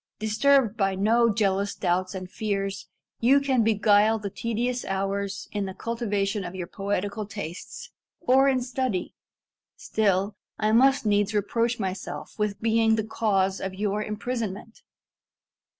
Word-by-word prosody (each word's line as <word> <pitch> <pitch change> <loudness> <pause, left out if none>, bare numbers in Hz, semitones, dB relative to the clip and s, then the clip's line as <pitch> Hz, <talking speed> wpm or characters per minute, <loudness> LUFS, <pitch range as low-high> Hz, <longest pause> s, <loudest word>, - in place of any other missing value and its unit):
"Disturbed 225 +2 +2
by 195 -2 +1
no 230 +4 +3
jealous 200 -1 0
doubts 185 +1 -1
and 185 -1 -5
fears, 195 0 -3 0.3
you 265 +4 +5
can 265 -4 +2
beguile 215 0 +4
the 205 -2 -5
tedious 240 +3 -2
hours 195 +1 -2
in 205 -2 -2
the 190 - -7
cultivation 205 -3 -2
of 180 +1 -7
your 180 -2 -4
poetical 200 +3 -3
tastes, 200 -5 -7 0.3
or 270 -3 +4
in 260 -2 +1
study. 245 -7 -2 0.6
Still, 200 -1 0 0.2
I 215 0 +1
must 265 +3 +4
needs 205 0 +2
reproach 230 +3 0
myself 190 -2 -5
with 210 -1 -1
being 225 0 +3
the 220 - -1
cause 195 -3 0
of 190 0 -4
your 205 +1 -1
imprisonment." 220 0 -5
210 Hz, 135 wpm, -26 LUFS, 195-230 Hz, 0.6 s, you